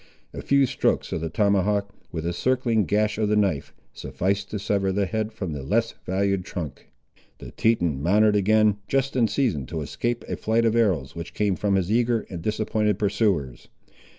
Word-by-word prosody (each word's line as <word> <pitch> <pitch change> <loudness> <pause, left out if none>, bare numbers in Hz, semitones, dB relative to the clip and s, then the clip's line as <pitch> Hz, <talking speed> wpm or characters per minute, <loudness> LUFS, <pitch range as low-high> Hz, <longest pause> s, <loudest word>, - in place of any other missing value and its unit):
A - - -6
few 140 0 +3
strokes - - 0
of 80 - -2
the 80 - -3
tomahawk, 100 +2 +1 0.2
with 80 -2 -4
a 85 - -1
circling 120 0 +1
gash 105 +2 0
of 105 -1 +1
the 105 - +2
knife, 95 -9 0 0.2
sufficed 100 +2 -2
to 105 - -3
sever 100 -1 0
the 100 +1 +1
head 110 +4 -2
from 95 -7 -5
the 70 - -5
less 115 +11 0
valued 95 0 0
trunk. 80 -7 -7 0.5
The - - -10
Teton 85 -11 +1
mounted 105 +6 +4
again, 105 +1 +3
just 135 +4 0
in 120 -3 +3
season 105 - -1
to 80 +2 -4
escape 120 +10 -3
a - - -3
flight 115 +1 +1
of 115 0 +2
arrows 90 - +1
which 85 0 -7
came 105 -3 +1
from 100 0 0
his 95 0 0
eager 120 0 +2
and 85 -3 -5
disappointed 105 0 0
pursuers. 100 - 0
105 Hz, 185 wpm, -24 LUFS, 90-110 Hz, 0.5 s, mounted